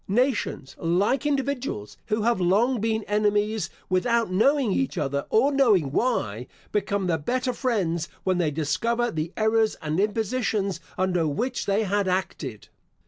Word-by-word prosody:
Nations, 225 - 0
like 195 - +1
individuals, 270 - -2
who 215 -1 0
have 235 -4 +2
long 220 +8 +3
been 220 0 0
enemies, 210 +1 +1 0.2
without 225 +3 +1
knowing 255 +4 +3
each 265 +5 -1
other, 140 0 -1
or 255 +6 +3
knowing 215 - +3
why, 125 - -1 0.2
become 200 -1 0
the 165 -3 0
better 250 - -1
friends 190 - -1
when 185 -1 +1
they 165 -3 +2
discover 230 +11 0
the 160 +2 -3
errors 220 0 +2
and 155 +2 -2
impositions 210 -1 0 0.2
under 180 -3 +1
which 240 - -2
they 200 +2 +2
had 200 -1 0
acted. 165 - -3
205 Hz, 140 wpm, -25 LUFS, 175-235 Hz, 0.2 s, long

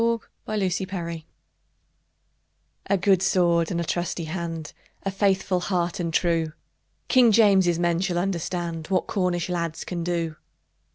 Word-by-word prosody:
"Trelawny"[edit] 185 -5 -2 1.6
A 200 - +3
good 190 0 +3
sword 170 -3 +3
and 170 - -1
a - - 0
trusty 175 0 -2
hand! 165 -2 -5 0.3
A 195 - -2
merry 195 -1 +5 0.3
heart 175 -2 -1
and 170 -2 -1
true! 165 -2 +1 0.5
King 250 -4 +6
James's 195 -6 +5
men 170 -1 +1
shall 180 -2 -1
understand 175 -3 -2
What 190 -1 +1
Cornish 180 -3 0
lads 170 -2 -2
can 175 -2 -4
do! 165 -2 -2
175 Hz, 125 wpm, -25 LUFS, 170-190 Hz, 1.6 s, King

